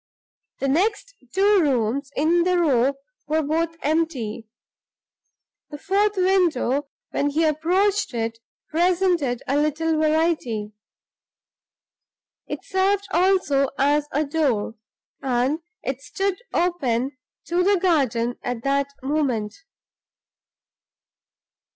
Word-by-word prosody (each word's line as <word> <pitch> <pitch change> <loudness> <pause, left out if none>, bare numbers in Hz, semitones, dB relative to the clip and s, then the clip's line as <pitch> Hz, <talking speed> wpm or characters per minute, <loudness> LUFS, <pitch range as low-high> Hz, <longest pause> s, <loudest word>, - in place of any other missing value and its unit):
The 275 - -2
next 415 - 0 0.2
two 400 +1 +4
rooms 265 -1 0
in 330 +4 +3
the 360 +1 +2
row 275 -5 +2 0.3
were 310 +1 +1
both 330 +3 -1
empty. 275 -8 -1 1.2
The 295 - -7
fourth 395 +4 +1
window, 330 -8 +2 0.2
when 285 - 0
he 310 +3 +1
approached 355 +3 +1
it, 230 0 -2 0.3
presented 345 -6 +1
a 275 - 0
little 310 +2 0
variety. 305 -9 0 1.7
It - - -5
served 395 +1 +1
also 350 -8 +2
as 290 +2 +2
a 300 +3 0
door; 275 -9 0 0.5
and 260 +3 0 0.2
it 265 0 -3
stood 375 +8 -2
open 275 -8 0 0.3
to 345 +1 0
the 400 +1 +3
garden 255 -10 +1
at 245 -2 -4
that 275 0 +1 0.2
moment. 265 -7 -1
305 Hz, 100 wpm, -23 LUFS, 265-355 Hz, 1.7 s, two